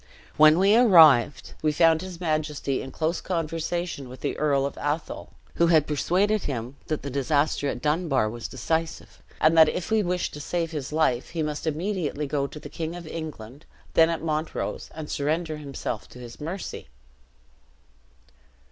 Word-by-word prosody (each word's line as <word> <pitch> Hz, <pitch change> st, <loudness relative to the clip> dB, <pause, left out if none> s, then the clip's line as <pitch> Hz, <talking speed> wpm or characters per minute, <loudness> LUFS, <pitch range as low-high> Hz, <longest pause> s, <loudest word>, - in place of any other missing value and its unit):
When 155 Hz, +1 st, +7 dB
we 195 Hz, +3 st, +5 dB
arrived, 160 Hz, -, +6 dB
we 155 Hz, -, +2 dB
found 160 Hz, +1 st, +4 dB
his 185 Hz, -2 st, -8 dB
majesty 155 Hz, -5 st, -1 dB
in 135 Hz, -, -7 dB
close 160 Hz, +5 st, -2 dB
conversation 165 Hz, -3 st, -3 dB
with 130 Hz, 0 st, -11 dB
the 145 Hz, -, -2 dB
Earl 140 Hz, -3 st, +1 dB
of 140 Hz, -, -4 dB
Athol, 145 Hz, +3 st, -3 dB, 0.3 s
who 170 Hz, -, +4 dB
had 160 Hz, -3 st, +4 dB
persuaded 190 Hz, +8 st, +1 dB
him 125 Hz, -1 st, -4 dB
the 155 Hz, -, 0 dB
disaster 140 Hz, +2 st, 0 dB
at 125 Hz, -3 st, -4 dB
Dunbar 150 Hz, -6 st, +1 dB
was 115 Hz, +1 st, -5 dB
decisive, 160 Hz, +6 st, -3 dB, 0.2 s
and 155 Hz, +1 st, +4 dB
that 160 Hz, -1 st, +7 dB
if 180 Hz, -, -4 dB
he 220 Hz, -1 st, +3 dB
wished 180 Hz, -2 st, -2 dB
to 150 Hz, -, -7 dB
save 165 Hz, +2 st, -2 dB
his 150 Hz, -4 st, -5 dB
life, 150 Hz, -6 st, +1 dB
he 165 Hz, -2 st, -2 dB
must 150 Hz, +1 st, -4 dB
immediately 160 Hz, -2 st, -2 dB
go 140 Hz, 0 st, -1 dB
to 145 Hz, +3 st, -10 dB
the -, -, -9 dB
King 165 Hz, +1 st, -5 dB
of 175 Hz, -1 st, -8 dB
England, 150 Hz, -5 st, -8 dB, 0.3 s
then 165 Hz, 0 st, +5 dB
at 165 Hz, -1 st, -3 dB
Montrose, 155 Hz, 0 st, -3 dB
and 155 Hz, -1 st, -6 dB
surrender 155 Hz, +3 st, -1 dB
himself 140 Hz, -6 st, -5 dB
to -, -, -14 dB
his 120 Hz, +1 st, -11 dB
mercy. 175 Hz, +5 st, -6 dB
155 Hz, 165 wpm, -25 LUFS, 140-165 Hz, 0.3 s, When